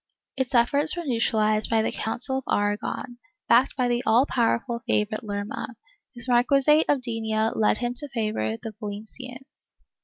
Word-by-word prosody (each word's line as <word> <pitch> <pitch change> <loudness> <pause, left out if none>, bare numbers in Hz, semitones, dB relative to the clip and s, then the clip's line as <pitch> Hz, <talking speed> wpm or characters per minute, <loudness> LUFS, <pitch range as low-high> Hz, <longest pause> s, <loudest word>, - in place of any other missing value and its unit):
Its 265 -1 -2
efforts 285 +7 +4
were 345 - -4
neutralized 220 -4 +1
by 225 -1 +2
the - - -1
Council 265 +4 0
of - - -12
Aragon, 205 +4 -2 0.3
backed 245 +3 +3
by 255 -2 0
the 240 0 0
all 230 +5 +3
powerful 235 -1 -1
favorite 215 +3 -1
Lerma, 205 +3 -5 0.4
whose 240 0 -6
marc^uisate 275 +5 +4
of 285 -3 +2
Denia 220 -2 -1
led 215 -1 +1
him 240 0 -2
to 290 +1 +3
favor 215 - -2
the 220 - -8
Valencians. 250 +6 -9
235 Hz, 155 wpm, -25 LUFS, 220-260 Hz, 0.4 s, efforts